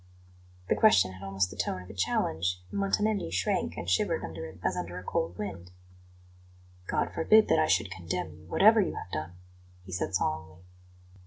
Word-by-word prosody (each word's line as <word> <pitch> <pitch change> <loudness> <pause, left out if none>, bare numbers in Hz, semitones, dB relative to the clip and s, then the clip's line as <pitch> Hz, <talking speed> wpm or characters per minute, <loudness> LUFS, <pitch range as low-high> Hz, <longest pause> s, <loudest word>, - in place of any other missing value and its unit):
The - - +2
question 95 -1 +5
had 95 0 -12
almost 95 -1 -1
the - - -9
tone 90 - -2
of - - -14
a - - -11
challenge, 90 -1 0
and - - -3
Montanelli 205 - +1
shrank 90 +1 -1
and 85 - -5
shivered 90 +1 +1
under 80 - -6
it 85 +3 -13
as - - 0
under 90 0 -4
a 90 - -7
cold 85 0 -2
wind. 95 -4 -6 1.2
"God - - -1
forbid 215 +7 +5
that 160 - +4
I 155 - +3
should 100 -4 +1
condemn 85 -2 -4
you, 80 +1 -16
whatever 220 +2 +6
you 185 - -1
have 90 - -7
done!" 80 +3 -4 0.5
he 95 - -10
said 90 +1 -2
solemnly. 90 +3 -2
90 Hz, 185 wpm, -29 LUFS, 85-100 Hz, 1.2 s, whatever